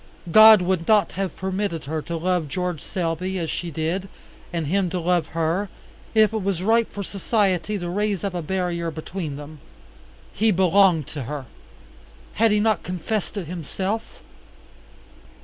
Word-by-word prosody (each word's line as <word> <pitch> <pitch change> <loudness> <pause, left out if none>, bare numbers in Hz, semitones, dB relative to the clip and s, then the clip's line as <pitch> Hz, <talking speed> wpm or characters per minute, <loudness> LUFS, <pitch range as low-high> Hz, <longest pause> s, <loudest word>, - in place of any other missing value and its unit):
God 215 0 +9
would 175 -2 0
not 215 -2 +4
have 195 -1 -3
permitted 190 -3 -3
her 155 +2 -3
to 170 +2 -4
love 175 -1 0
George 180 0 -3
Selby 180 0 -2
as 165 -3 -2
she 175 - -3
did, 165 +5 -2 0.4
and 170 -3 -2
him 185 +4 +1
to 180 - -2
love 175 -2 +1
her, 170 +5 0 0.5
if 220 0 +5
it 220 - -1
was 190 -2 -1
right 225 +2 +3
for 200 - -5
society 200 0 0
to 175 -2 -4
raise 205 +1 -1
up 200 -2 -2
a 175 - -2
barrier 175 0 -2
between 160 -1 -5
them. 145 +1 -10 0.7
He 220 +2 +2
belonged 185 -4 +4
to 145 -5 -6
her. 140 +1 -5 0.9
Had 225 +1 +3
he 210 0 +3
not 215 -3 +2
confessed 185 +4 -3
it 195 - -3
himself? 185 +6 -4
185 Hz, 160 wpm, -23 LUFS, 165-200 Hz, 0.9 s, God